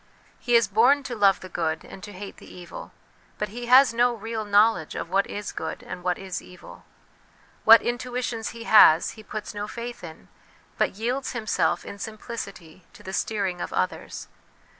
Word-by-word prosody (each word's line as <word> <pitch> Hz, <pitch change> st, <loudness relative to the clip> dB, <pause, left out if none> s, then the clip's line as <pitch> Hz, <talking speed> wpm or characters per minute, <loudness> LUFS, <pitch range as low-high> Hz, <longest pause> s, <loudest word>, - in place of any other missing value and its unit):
He 240 Hz, -, +1 dB
is 230 Hz, -3 st, +5 dB
born 245 Hz, +8 st, +4 dB
to 250 Hz, -3 st, -5 dB
love 200 Hz, -3 st, +3 dB
the 185 Hz, -, -8 dB
good, 160 Hz, -3 st, -3 dB
and 190 Hz, -, -11 dB
to 205 Hz, -, -8 dB
hate 200 Hz, +1 st, -9 dB
the -, -, -14 dB
evil, 175 Hz, -1 st, -10 dB, 0.5 s
but 210 Hz, -, -3 dB
he 240 Hz, +3 st, -7 dB
has 255 Hz, 0 st, +7 dB
no 240 Hz, +1 st, +2 dB
real 225 Hz, 0 st, -4 dB
knowledge 205 Hz, -4 st, +3 dB
of 170 Hz, -, -5 dB
what 195 Hz, +1 st, +2 dB
is 205 Hz, 0 st, -5 dB
good -, -, -6 dB
and 180 Hz, -, -8 dB
what 180 Hz, 0 st, -1 dB
is 190 Hz, -2 st, -5 dB
evil; 180 Hz, -, -14 dB, 0.8 s
what 225 Hz, +1 st, +9 dB
intuitions 245 Hz, -2 st, -3 dB
he 230 Hz, 0 st, -9 dB
has, 175 Hz, -8 st, +6 dB
he 220 Hz, -, -12 dB
puts 215 Hz, 0 st, -7 dB
no 205 Hz, 0 st, -4 dB
faith 235 Hz, 0 st, -7 dB
in, 160 Hz, -, -11 dB, 0.5 s
but -, -, +1 dB
yields 250 Hz, +6 st, -2 dB
himself 225 Hz, -4 st, 0 dB
in 200 Hz, -, -9 dB
simplicity 200 Hz, -6 st, -8 dB
to -, -, -16 dB
the 190 Hz, -, -7 dB
steer 205 Hz, 0 st, -1 dB
ing 180 Hz, -2 st, -3 dB
of -, -, -4 dB
others. 90 Hz, -, -3 dB
210 Hz, 185 wpm, -25 LUFS, 190-235 Hz, 0.8 s, what